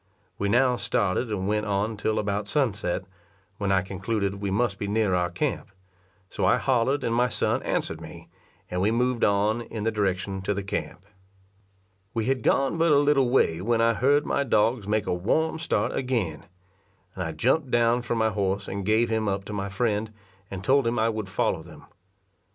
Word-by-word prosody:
We 100 - 0
now 125 +3 +3
started 100 +2 0
and 95 -3 -2
went 105 +1 0
on 105 +2 0
till 110 +1 -1
about 100 0 -1
sunset, 105 -11 0 0.6
when 100 -1 0
I 95 -1 +3
concluded 100 +1 -3
we 100 - -1
must 100 0 0
be 100 - -3
near 105 -2 +1
our 90 -1 +1
camp; - - -3 0.6
so - - -4
I - - +4
hollered 130 +2 +1
and 115 - 0
my 125 +1 +2
son - - 0
answered - - -2
me, - - -11 0.4
and 90 0 -1
we 100 - +3
moved 125 +1 0
on 105 +3 +2
in 110 -2 -6
the 115 - +1
direction 95 -2 -1
to 100 +1 -1
the 100 - -3
camp. 95 -1 -5 1.1
We 115 -1 0
had 130 0 0
gone 135 +8 +1
but 165 -1 +4
a 145 - +6
little 140 -3 +3
way 85 -10 +2
when 115 +3 +1
I 115 0 +4
heard 145 +6 +2
my 140 - 0
dogs 110 -3 +1
make 105 0 0
a - - 0
warm 160 - 0
start 170 - 0
again; 105 - -2 0.7
and 90 - -4
I 80 - -3
jumped 130 - +1
down 120 0 +3
from 120 -1 -2
my 110 0 +2
horse 100 0 -1
and 100 0 -4
gave 110 +3 +2
him 110 -1 0
up 100 0 -2
to 105 - -6
my 100 -1 -3
friend, 105 +1 -1 0.4
and 95 -1 -6
told 135 +2 +3
him 120 +1 0
I 110 +1 +2
would 110 -3 -4
follow - - 0
them. - - -14
110 Hz, 195 wpm, -26 LUFS, 100-120 Hz, 1.1 s, a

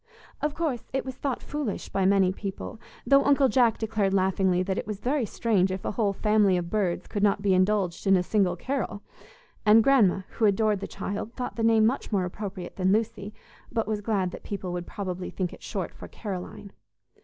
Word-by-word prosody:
Of 300 0 -1
course, 305 -8 -1
it 270 - -1
was 260 - -4
thought 265 0 -3
foolish 290 -9 -4
by 190 -1 +1
many 195 -2 +4
people, 195 +2 -6 0.3
though 275 +3 +5
Uncle 280 -1 +4
Jack 235 -1 +3
declared 215 -3 0
laughingly 190 -1 +2
that 190 0 -1
it - - -6
was 210 -2 -4
very 260 -1 0
strange 200 -5 +1
if 185 0 -5
a - - 0
whole 210 -1 +1
family 210 -2 +3
of 170 -1 -4
Birds 195 -5 0
could 205 - -4
not 200 -1 +2
be 195 -2 +3
indulged 185 -1 +1
in 195 - +6
a 180 - +1
single 190 -2 +1
Carol; 250 -1 -3 0.6
and 215 +1 +6
Grandma, 215 -9 +4
who 225 - 0
adored 210 0 +2
the 200 - -5
child, 205 +3 -5
thought 250 - -4
the 230 - -3
name 225 -1 +4
much 245 +2 -1
more 195 -3 +1
appropriate 190 0 -6
than 185 0 +2
Lucy, 215 -1 -1 0.4
but 225 -3 -1
was 215 -1 -1
glad 195 -4 0
that - - -9
people 190 -3 -5
would 175 -1 -4
probably 185 -2 -4
think 180 -2 -3
it - - -13
short - - -4
for - - -10
Caroline. 200 0 -7
205 Hz, 205 wpm, -27 LUFS, 190-225 Hz, 0.6 s, in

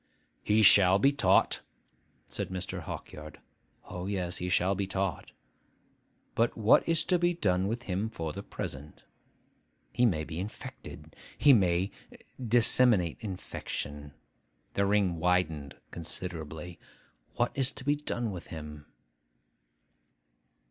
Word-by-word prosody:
'He 110 +1 +3
shall 95 -2 +8
be 135 +8 +4
taught,' 140 - +3 0.7
said - - -4
Mr. 95 0 -4
Hawkyard, 75 0 -8 0.5
'(O, 90 +1 -6
yes, 90 -3 -3
he 90 - -3
shall 90 +2 +2
be 100 0 -2
taught!) 95 -2 -3 1.0
but 115 +1 +1
what 110 +8 +4
is 165 -2 +2
to 180 +1 +1
be 175 0 +2
done 95 - +1
with 115 +3 -3
him 100 +4 -2
for 80 -8 -5
the 100 - -6
present? 75 -6 -7 0.9
He 125 - +4
may 80 -7 0
be 80 +1 -6
infected. 95 -6 -8 0.2
He 145 -1 +6
may 95 -3 +2 0.5
disseminate 115 -6 +4
infection.' 75 - -6 0.6
The 100 0 +1
ring 100 -4 +2
widened 80 -4 0 0.2
considerably. 85 0 -6 0.6
'What 120 - +1
is 135 -1 +1
to - - -11
be 145 +2 +2
done 120 -6 -2
with 90 -2 -8
him? 75 -2 -9
95 Hz, 125 wpm, -29 LUFS, 85-115 Hz, 1.0 s, shall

